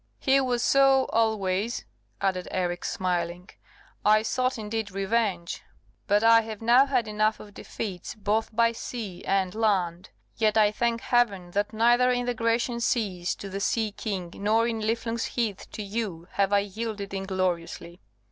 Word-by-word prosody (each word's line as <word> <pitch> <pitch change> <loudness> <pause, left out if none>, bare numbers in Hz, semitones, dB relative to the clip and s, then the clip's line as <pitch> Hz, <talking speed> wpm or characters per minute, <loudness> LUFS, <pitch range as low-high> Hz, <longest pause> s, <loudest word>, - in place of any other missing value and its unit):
"He 270 0 +3
was 245 -2 0
so 270 -1 +5
always," 220 -1 0 0.4
added 185 -2 0
Eric, 175 -1 -2
smiling; 180 -2 -2 0.5
"I 215 +1 +5
sought, 255 +3 0
indeed, 220 -1 -3
revenge; 195 -2 -1 0.5
but 205 +2 +3
I 230 0 +7
have 220 -2 -7
now 240 +4 +5
had 250 -5 +1
enough 215 +1 +1
of 205 - -12
defeats 195 -3 -6
both 215 +1 0
by 230 +1 +3
sea 225 -5 -6
and 190 -2 +1
land. 190 -6 0 0.3
Yet 220 -1 +2
I 210 -1 +5
thank 230 +1 -1
Heaven 200 -8 +1
that 205 +3 -1
neither 240 +3 +4
in 245 -1 0
the 245 - 0
Grecian 235 +1 0
seas, 195 -7 -1
to 200 - -8
the 195 0 -5
sea 215 +1 0
king, 190 -5 -5
nor 220 +3 +1
in 225 -1 -2
Niflung's 230 +1 -1
Heath, 225 -5 -3
to 215 - -5
you, 200 -5 -4
have 200 0 +1
I 200 0 +4
yielded 205 0 -5
ingloriously." 185 -3 -3
215 Hz, 155 wpm, -26 LUFS, 195-230 Hz, 0.5 s, I